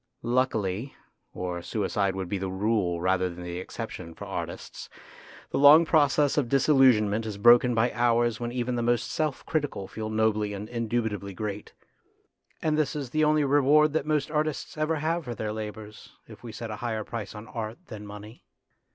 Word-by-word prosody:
Luckily 120 -2 -1 0.4
or 90 -1 -4
suicide 100 0 -1
would 95 -1 -4
be 100 +2 -2
the 95 0 -3
rule 95 -3 0
rather 95 +1 +1
than 90 0 -9
the 90 0 -5
exception 90 -4 -7
for - - -8
artists - - -6 0.6
the - - 0
long 150 +4 +8
process 150 -2 +3
of 125 -5 -2
disillusionment 125 -6 +4
is 105 -2 -5
broken 120 +3 +6
by 115 +2 +2
hours 120 -1 +1
when 120 0 -3
even 125 0 -2
the 120 - -1
most 120 0 0
self 155 -3 -2
critical 145 -11 -2
feel 110 -1 -5
nobly 110 -1 +1
and 100 +1 -6
indubitably 110 -4 -2
great; 105 0 -5 0.9
and 155 -1 +1
this 150 0 0
is 140 -5 -5
the 155 +2 +1
only 150 0 +3
reward 145 +2 +4
that 155 -2 -1
most 150 -1 0
artists 155 -1 -2
ever 155 +1 0
have 165 +3 -1
for 120 -1 -5
their 105 -1 -3
labours, 105 -1 -8
if 110 -2 -13
we 120 - -8
set 110 +1 -6
a 105 - -5
higher 110 -2 -3
price 105 -2 -6
on 105 +1 -9
art 110 -1 -5
than 110 -7 -9
money. 105 +2 -11
115 Hz, 180 wpm, -27 LUFS, 105-140 Hz, 0.9 s, long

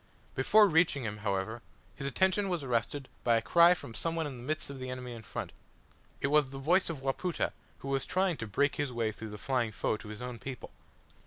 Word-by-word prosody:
Before 210 +11 +6
reaching 165 -5 +3
him, 105 -1 -3
however, 105 +2 -2 0.3
his 140 - -4
attention 190 +6 +2
was 175 -5 -1
arrested 130 +2 -1 0.2
by 120 -1 +4
a - - +1
cry 170 +11 +6
from 115 - -9
some 165 +7 -1
one 165 -1 0
in 140 -4 -5
the - - -9
midst 155 +1 -2
of 135 - -8
the 130 0 -5
enemy 125 -1 -5
in 115 - -8
front. - - -5 0.7
It 140 - +1
was 150 -2 +4
the 135 - -8
voice 170 +8 +2
of 145 -5 -5
Wapoota, 160 +6 -1 0.2
who - - -9
was 135 -1 0
trying 185 -3 +1
to 115 - -5
break 140 +8 +1
his 145 -3 -1
way 115 -2 0
through 110 +1 -8
the 105 - -7
flying 125 -1 0
foe 100 +3 -1
to 105 - -11
his 105 +3 -7
own 125 -2 -5
people. 130 0 -7
135 Hz, 230 wpm, -31 LUFS, 115-160 Hz, 0.7 s, Before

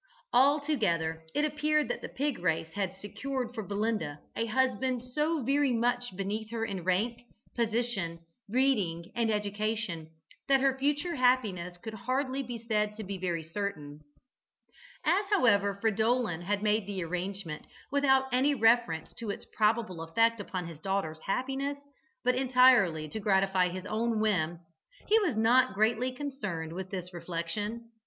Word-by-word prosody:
Altogether 240 - +2
it 295 - +3
appeared 300 0 +1
that - - -3
the - - -6
pig 285 0 -2
race 165 -2 0
had 195 -2 -2
secured 250 +5 -4
for 225 - -4
Belinda 205 -7 -2 0.2
a 230 - -1
husband 255 +1 +1
so 300 +4 -1
very 275 +2 +2
much 245 -2 0
beneath 205 +3 -3
her 225 -1 -2
in 195 -5 -4
rank, 215 +7 0 0.3
position, 225 -7 -1 0.3
breeding 205 -9 +1
and 230 -1 +1
education 210 -5 -2 0.4
that 270 -1 +5
her 270 0 +3
future 290 +5 0
happiness 210 -9 +1
could 220 +4 -8
hardly 260 +4 -1
be 245 -2 -5
said 210 -2 -1
to 220 - -6
be 195 -1 -5
very 175 -3 -2
certain. 160 -4 -5 1.1
As, 400 +3 +3
however, 205 - +3
Fridolin 220 -3 +1
had 200 +3 -1
made 210 -1 +2
the 195 -3 -3
arrangement 180 -1 -4 0.2
without 265 -2 +4
any 270 +4 +3
reference 225 - +2
to 230 - -5
its 200 - -5
probable 215 -5 +1
effect 230 +8 +2
upon 185 -3 -4
his 165 -3 -9
daughter's 190 -4 -2
happiness, 270 +5 -1 0.5
but 250 0 +3
entirely 250 -11 +4
to 220 - -5
gratify 195 -2 +3
his 185 +1 -6
own 220 +2 0
whim, 175 -6 0 0.5
he 440 +2 +5
was 360 - 0
not 240 0 +4
greatly 225 +4 +2
concerned 210 - -4
with 185 +1 -5
this 185 -1 -6
reflection. 180 +7 -4
220 Hz, 150 wpm, -30 LUFS, 185-255 Hz, 1.1 s, that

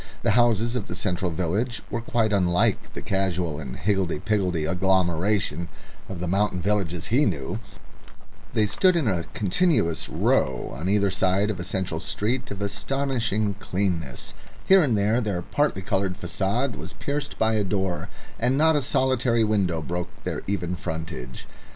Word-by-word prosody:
The 115 - +3
houses 115 +1 +3
of 115 -5 -2
the 90 - -5
central 90 0 -1
village 100 +8 -1
were 120 - -1
quite 115 -2 +1
unlike 90 -3 +2
the - - -5
casual 90 -5 -1
and 65 -5 -6
higgledy 95 -5 0
piggledy 90 -3 0
agglomeration 90 0 +1 0.4
of 95 - -5
the 90 - -3
mountain 95 +1 +1
villages 90 -3 -1
he 140 +5 +5
knew; 90 - -1 1.0
they 110 - +4
stood 185 - +3
in 160 -7 +1
a 90 -5 0
continuous 100 - +1
row - - +1
on 80 +8 -3
either 100 -1 +3
side 95 +2 +2
of 95 - -6
a - - -3
central 95 0 -2
street 120 +5 -2
of 100 0 -4
astonishing 110 -1 -1
cleanness; 90 -8 -2 0.3
here 190 0 +7
and 125 -9 +2
there 105 +4 +2
their 100 -6 -2
particoloured 95 - 0
facade 100 +7 -1
was 95 - -7
pierced 140 0 -3
by 110 0 +2
a 105 -1 +2
door, 95 -2 -1 0.3
and 125 +3 +2
not 160 +1 +4
a 145 - +2
solitary 125 -3 +2
window 95 -7 +1
broke 90 +3 -3
their - - -3
even 90 -3 -1
frontage. 80 -7 -6
100 Hz, 155 wpm, -25 LUFS, 90-115 Hz, 1.0 s, here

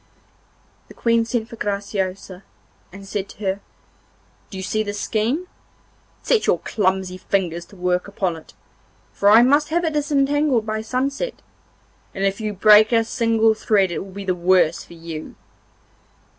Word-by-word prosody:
The - - -15
Queen 230 -1 +2
sent 230 -1 -2
for 230 - -10
Graciosa, 195 -2 -3 0.5
and 195 +1 -11
said 200 -1 -4
to - - -14
her: 190 +1 0 0.9
'Do 195 - -8
you 190 - -5
see 215 +3 -1
this 205 -1 -4
skein? 240 +11 -1 0.8
Set 460 - +1
your - - +3
clumsy 190 -2 -1
fingers 175 -4 -1
to - - -17
work 180 0 -1
upon 190 -3 -2
it, 160 - -14 0.6
for 200 - +3
I 225 +3 +8
must 285 +4 +3
have 340 +2 0
it 320 - -1
disentangled 290 -4 +1
by 215 0 -2
sunset, 270 - -3 0.7
and 195 - -3
if 195 +2 -1
you 215 -1 -2
break 210 +2 +6
a 230 -1 +4
single 225 -1 +2
thread 200 -4 +1
it - - -3
will 195 - -8
be 200 +1 -7
the 185 - +1
worse 180 -2 +2
for - - -15
you. 165 -2 -8
205 Hz, 160 wpm, -21 LUFS, 190-230 Hz, 0.9 s, I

